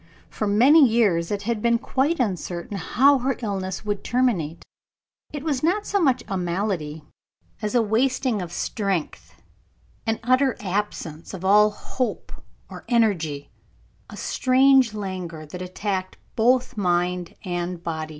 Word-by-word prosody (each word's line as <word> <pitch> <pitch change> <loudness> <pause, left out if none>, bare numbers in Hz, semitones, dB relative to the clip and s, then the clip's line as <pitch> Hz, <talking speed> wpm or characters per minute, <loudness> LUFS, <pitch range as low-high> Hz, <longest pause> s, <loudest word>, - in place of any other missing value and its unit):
For 215 - -2
many 260 +10 +6
years 210 -9 +3
it 205 -1 -3
had 230 0 -2
been 235 +1 +3
quite 275 +7 0
uncertain 185 -4 -3
how 265 +9 +3
her 260 +1 -1
illness 190 -2 -3
would 205 -1 -2
terminate. 210 -11 0 0.7
It 295 -2 -6
was 290 -5 -1
not 385 +6 +1
so 400 - 0
much 270 -8 +2
a 195 - -2
malady 170 -4 -2 0.6
as 210 +3 -2
a 240 - +4
wasting 230 0 +1
of 175 -2 -6
strength, 195 -3 -3 0.7
an 225 0 0
utter 255 +2 +2
absence 185 -4 -4
of 190 0 -7
all 210 +2 +6
hope 245 +4 -4 0.4
or - - -10
energy, 175 - +1 0.6
a - - -10
strange 260 -3 +3
languor 185 -6 -5
that 180 +4 -8
attacked 185 +1 -3 0.2
both 250 +3 +2
body 180 -2 -1
and 175 -1 -4
mind. 160 -2 -3
205 Hz, 140 wpm, -24 LUFS, 180-250 Hz, 0.7 s, many